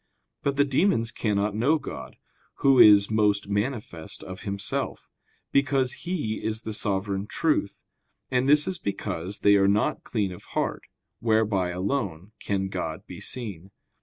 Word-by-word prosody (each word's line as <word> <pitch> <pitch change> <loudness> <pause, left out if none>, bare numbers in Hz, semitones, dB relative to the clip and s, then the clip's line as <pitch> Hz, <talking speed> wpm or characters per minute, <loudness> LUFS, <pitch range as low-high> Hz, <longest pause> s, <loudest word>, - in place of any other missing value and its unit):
But 140 0 0
the 140 0 +4
demons 135 - +2
cannot 105 -2 0
know 135 +9 +3
God, 65 - -8 0.5
Who 135 -2 +6
is 100 -1 +8
most 105 -2 +2
manifest 100 -5 -3
of 95 0 -8
Himself, 100 -1 -3 0.4
because 135 -2 +2 0.2
He 145 -12 -2
is 110 +1 -2
the 110 - -4
sovereign 100 -1 -1
truth; 150 -10 0 0.5
and 130 +1 +2
this 150 0 +5
is 185 -2 -2
because 100 - -4
they 100 0 +6
are 95 0 +4
not 105 +2 +1
clean 105 -5 -1
of 90 - -9 0.2
heart, - - -1 0.3
whereby 110 -5 +1
alone 95 - -3
can 95 -1 -1
God 85 -4 -4
be - - -9
seen. 100 -8 -5
105 Hz, 145 wpm, -26 LUFS, 100-130 Hz, 0.5 s, is